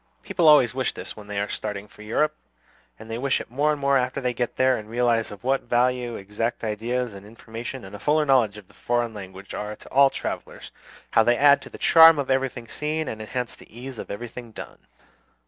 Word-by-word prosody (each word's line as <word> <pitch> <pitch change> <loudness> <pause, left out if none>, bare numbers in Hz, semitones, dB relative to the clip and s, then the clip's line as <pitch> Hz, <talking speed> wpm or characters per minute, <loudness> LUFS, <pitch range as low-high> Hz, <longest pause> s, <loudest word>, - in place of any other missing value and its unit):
People 170 -3 +1
always 140 -6 +7
wish 130 -1 -1
this - - -7
when 105 -1 -12
they 105 -1 -3
are 100 - -1
starting 105 -1 -5
for 105 - -17
Europe; 150 +8 0 0.6
and 110 - -12
they 115 +1 -4
wish 135 +1 +1
it - - -9
more 145 +4 +2
and 150 - -2
more 140 0 +3
after 125 +2 -2
they 125 -2 -1
get 120 +1 -2
there, 130 0 +3
and 110 -2 -7
realize 115 -1 +1
of 105 - -11
what 135 +1 +1
value 120 0 0
exact 105 +5 -3
ideas 115 +2 -2
and 100 0 -10
information 115 +3 -8
and 95 +2 -10
a - - -9
fuller 150 +6 +2
knowledge 120 -7 +3
of 100 -3 -12
the - - -22
foreign 120 -1 -1
languages 95 -1 -9
are 105 +1 -4
to - - -15
all 140 +1 +6
travellers; - - -6 0.4
how - - +5
they 120 +2 +3
add 140 +1 +6
to - - -10
the - - -10
charm 165 -1 +8
of 140 -2 -1
everything 130 -3 -1
seen, 155 +4 -3
and 110 -3 -5
enhance 125 +3 -4
the - - -15
ease 130 -2 -8
of - - -7
everything 120 +2 -7
done. - - -10
120 Hz, 225 wpm, -24 LUFS, 110-135 Hz, 0.6 s, charm